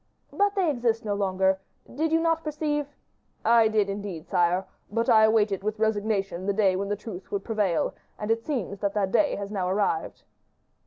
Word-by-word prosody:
"But 405 0 +2
they 380 -3 +2
exist 235 -5 0
no 205 - 0
longer. 190 -1 +1 0.3
Did 315 +4 -2
you 325 - +4
not 330 0 +1
perceive 295 -1 -2 0.4
" - - -40
"I 225 - +5
did, 215 -2 +2
indeed, 195 -5 -5
sire; 180 +1 +2 0.3
but 230 +2 0
I 220 -1 +7
awaited 210 -3 +2
with 215 +2 -2
resignation 205 -4 -1
the 200 - +2
day 195 -2 +3
when 200 +1 -2
the 205 - 0
truth 205 -3 -9
would 200 -1 -2
prevail; 205 -7 0 0.2
and 210 +1 -2
it 225 0 0
seems 225 - -3
that 200 0 -1
that 195 -2 0
day 295 +5 +3
has 200 0 -5
now 185 -3 -1
arrived." 190 -4 -1
210 Hz, 195 wpm, -26 LUFS, 195-230 Hz, 0.4 s, I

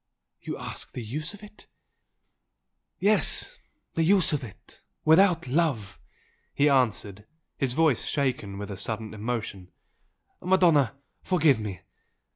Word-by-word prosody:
You - - -5
ask - - -8
the 125 - -5
use 150 - -4
of 205 - -16
it? 210 0 -14 0.7
" - - -54 0.5
"Yes 215 - +1 0.3
the 165 - 0
use 185 0 +4
of 145 - -1
it 110 -6 -13 0.2
without 170 +1 +5
love!" 135 - 0 0.6
he 145 - +4
answered, 105 -6 0 0.3
his 135 -3 -1
voice 155 -5 +2
shaken 125 -9 -1
with 100 0 -6
a 100 - -6
sudden 110 +2 -4
emotion 110 -4 -4 0.7
"Madonna, 175 -7 +3 0.3
forgive 155 -9 +3
me! 105 -4 -6
135 Hz, 125 wpm, -27 LUFS, 110-165 Hz, 0.7 s, without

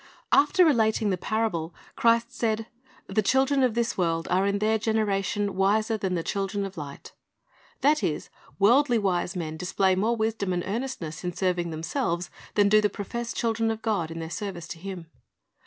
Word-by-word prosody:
After 320 +5 +5
relating 220 -7 +2
the - - +2
parable, 180 -6 -2 0.2
Christ 230 0 +2
said, 225 -1 0 0.2
" 260 - -27
The 195 +2 +1
children 265 +5 +2
of 250 -4 +2
this 235 -4 -1
world 165 -2 0
are 190 +2 +3
in 200 0 +1
their 220 +2 +1
generation 205 -2 0
wiser 215 +4 +2
than 190 -3 -2
the 165 - -1
children 200 +1 -2
of 195 0 -7
light." 145 -3 -8 0.7
That 295 0 +4
is, 165 -5 -2 0.3
worldly 240 +5 +4
wise 190 -3 0
men 160 -3 -4
display 185 +2 +1
more 215 +6 +1
wisdom 220 -4 -1
and 175 -1 -1
earnestness 205 -8 -4
in 180 0 -2
serving 180 -2 0
themselves 170 - -2 0.2
than 205 -1 +5
do 215 +1 +5
the 210 - +2
professed 235 +4 -5
children 225 -1 +1
of 225 0 -3
God 200 -8 0
in 165 - -7
their 165 0 -5
service 175 -2 -5
to 165 - -7
Him. 185 -2 -7
200 Hz, 180 wpm, -26 LUFS, 180-225 Hz, 0.7 s, After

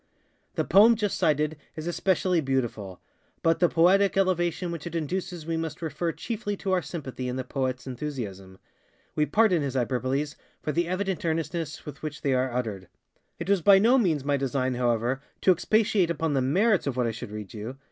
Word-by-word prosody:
ŌĆØ - - -42
The - - +1
poem 220 +4 +7
just 210 -3 -1
cited 150 0 +1 0.2
is 155 - -6
especially 180 0 +1
beautiful; 120 - -2 0.4
but 165 0 +3
the 175 - +4
poetic 195 +4 +4
elevation 180 -2 +1
which 170 0 -5
it 170 - -6
induces 175 +1 -3
we 165 0 -1
must 160 -1 -4
refer 165 +2 -2
chiefly 205 +1 -4
to 190 - -3
our 185 -1 +2
sympathy 135 -7 -6
in 125 - -3
the 130 - -2
poetŌĆÖs 130 -1 -3
enthusiasm. 115 -9 -6 0.6
We 150 0 +1
pardon 195 0 +3
his 135 -2 -3
hyperboles 130 +4 -1 0.2
for 150 - -3
the 170 +2 0
evident 190 +1 -2
earnestness 160 -1 -2
with 145 -2 -9
which 150 -1 -6
they 140 - +2
are 130 0 +1
uttered. 110 -7 -3 0.5
It 170 - -6
was 200 -2 +3
by 195 +4 +7
no 235 +7 +5
means 160 - +1
my 145 0 +2
design, 130 -1 -1
however, 120 +1 0 0.2
to 190 - +5
expatiate 210 0 +2
upon 160 -2 -1
the 135 - +2
_merits 190 - +2
_of - - -12
what 125 -1 +1
I 115 - 0
should 110 -1 -7
read 105 +1 -7
you. 115 +5 -6
155 Hz, 195 wpm, -27 LUFS, 130-180 Hz, 0.6 s, poem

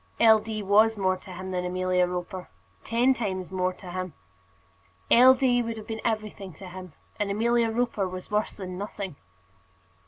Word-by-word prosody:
L. 220 -1 +7
D. 215 -1 -5
was 215 +3 +4
more 190 -2 +2
to 185 - -14
him 185 +1 -6
than 180 -1 -1
Amelia 180 0 +1
Roper, 180 +1 -5 0.3
ten 240 +3 +3
times 190 -7 -3
more 185 -1 0
to 180 -1 -10
him. 185 -2 -4 1.0
L. 255 +2 +8
D. 250 -2 +2
would 230 -1 -4
have 215 - -8
been 220 -1 -5
everything 215 -4 -3
to 190 +2 -10
him, 185 -2 -9 0.3
and 205 -1 0
Amelia 230 +3 +2
Roper 225 -4 0
was 185 +1 -8
worse 210 +1 0
than 185 -2 -6
nothing. 200 -4 -5
200 Hz, 175 wpm, -27 LUFS, 185-225 Hz, 1.0 s, L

